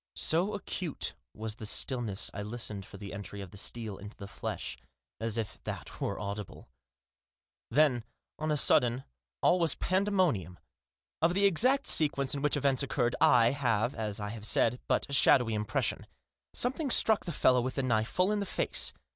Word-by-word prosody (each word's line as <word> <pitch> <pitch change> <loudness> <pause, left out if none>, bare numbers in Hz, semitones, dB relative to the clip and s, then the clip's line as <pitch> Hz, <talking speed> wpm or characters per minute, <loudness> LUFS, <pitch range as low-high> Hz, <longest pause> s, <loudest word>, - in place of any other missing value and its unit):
So 180 +6 0
acute 180 -5 -4 0.2
was 110 0 -4
the 110 - -7
stillness 115 -5 -1
I - - -5
listened 105 -2 -5
for - - -11
the 100 0 -8
entry 100 0 -7
of 95 -3 -8
the - - -11
steel 110 -1 -5
into 105 +2 -10
the 100 - -8
flesh - - -5 0.2
— 65 +1 -62
as 115 0 -1
if 110 -3 -4
that - - -7
were - - -2
audible! 100 0 -7 1.0
Then, 130 -3 +3 0.4
on 155 0 -2
a 150 - +1
sudden, 125 -2 +3 0.4
all 180 - +4
was 165 -2 +2
pandemonium. 185 - 0 0.6
Of 170 +2 +2
the 200 +1 +3
exact 255 - +4
sequence 140 -3 +4
in 140 - -3
which 150 0 +1
events 140 -1 +1
occurred, 125 -3 0
I 120 -1 +5
have, 120 -3 0
as 110 -2 -4
I 105 0 -4
have 110 0 -5
said, 120 +2 +3
but - - +1
a 140 - -6
shadowy 125 -4 +5
impression. 105 -1 -1 0.4
Something 265 +4 0
struck 220 -3 +4
the 175 - -3
fellow 125 -4 +3
with 130 +1 -3
the 135 - -1
knife 110 -3 +1
full 185 +3 +1
in 210 - 0
the 200 - -3
face. - - -1
125 Hz, 180 wpm, -30 LUFS, 105-155 Hz, 1.0 s, I